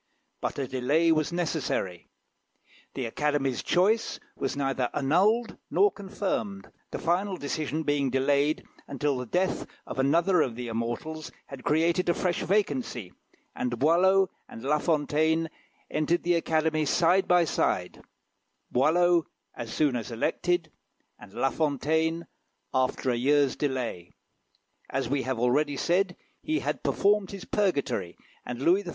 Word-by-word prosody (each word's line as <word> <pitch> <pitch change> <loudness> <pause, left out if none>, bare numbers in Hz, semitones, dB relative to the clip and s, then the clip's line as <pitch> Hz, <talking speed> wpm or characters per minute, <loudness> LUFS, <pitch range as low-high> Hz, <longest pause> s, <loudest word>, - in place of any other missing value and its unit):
But - - -2
a 135 -2 -2
delay 140 +7 +2
was 155 -1 +1
necessary. 155 - -2 0.9
The 130 - -2
Academy's 140 +1 0
choice 205 +6 +2 0.2
was 135 - -3
neither 135 -3 0
annulled 200 - +2
nor 405 0 +4
confirmed; 200 0 -4 0.2
the - - -4
final 185 +3 0
decision 155 +1 -2
being 145 -2 +1
delayed 140 +3 +1 0.2
until 140 0 -1
the 125 -1 -4
death 185 +8 0 0.2
of - - -6
another 170 +6 +3
of 120 -6 -1
the 120 0 -5
immortals 120 +8 -4
had 135 -2 -10
created 170 +4 +2
a 170 - +3
fresh 180 -2 0
vacancy, 130 - -1 0.4
and 120 -1 -2
Boileau 185 +7 +4 0.2
and 115 - -10
La 150 +3 +2
Fontaine 160 +1 +1 0.4
entered 165 +3 +1
the 175 - +2
Academy 160 -2 +1
side 180 +5 +3
by 180 -1 +5
side; 90 - -1 0.7
Boileau 170 +5 +3 0.3
as 115 -2 -7
soon 145 -2 +1
as 115 -1 -3
elected, 165 +8 -1 0.5
and 100 - -13
La 135 - +1
Fontaine 160 +3 0 0.5
after 130 0 +1
a - - +1
year's 140 +2 +3
delay. 125 - -3 0.8
As 135 -2 -1
we 140 +2 0
have 130 -1 -2
already 140 +5 +1
said, 180 +3 +1 0.3
he 315 +1 -1
had - - -2
performed 205 -1 +2
his 195 -2 -8
purgatory, 140 - -1 0.3
and 125 +2 -4
Louis 180 +6 +4
XIV. 185 - -8
150 Hz, 140 wpm, -27 LUFS, 130-175 Hz, 0.9 s, by